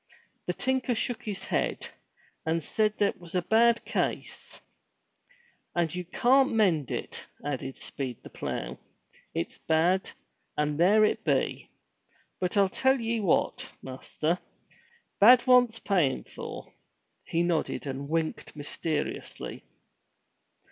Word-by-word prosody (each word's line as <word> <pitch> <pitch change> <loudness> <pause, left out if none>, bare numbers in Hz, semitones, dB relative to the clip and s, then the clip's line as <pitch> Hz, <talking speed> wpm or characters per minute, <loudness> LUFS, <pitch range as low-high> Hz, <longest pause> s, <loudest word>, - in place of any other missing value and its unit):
The - - +1
tinker 260 -1 0
shook 245 +1 -2
his 205 -3 -4
head 65 -3 -1 0.5
and 160 0 0
said 215 +6 0
that 205 - +1
was 175 0 -9
a 180 - +1
bad 230 +4 +4
case. - - -3 1.2
*'And 170 -3 +1
you 180 0 -4
can't 260 +8 +4
mend 180 - +2
it," - - -5 0.2
added 135 -2 -3
Speed 130 -4 -5
the - - -11
plough. - - -4 0.6
It's - - -3
bad, 175 +4 +2 0.5
and 150 0 0
there 210 +5 +6
it - - 0
be. - - 0 0.7
But 180 +2 0
I'll 200 -1 +5
tell 265 +7 +2
ye 230 0 -1
what, 195 -6 +1
master. 155 +6 -2 0.8
Bad 240 +4 +8
wants 245 -3 +5
payin' 175 -12 +1
for." - - -9 0.5
He 165 +1 0
nodded 170 -4 -1
and 140 +1 -5
winked 160 -1 -2
mysteriously. 150 +1 -4
180 Hz, 120 wpm, -28 LUFS, 155-225 Hz, 1.2 s, Bad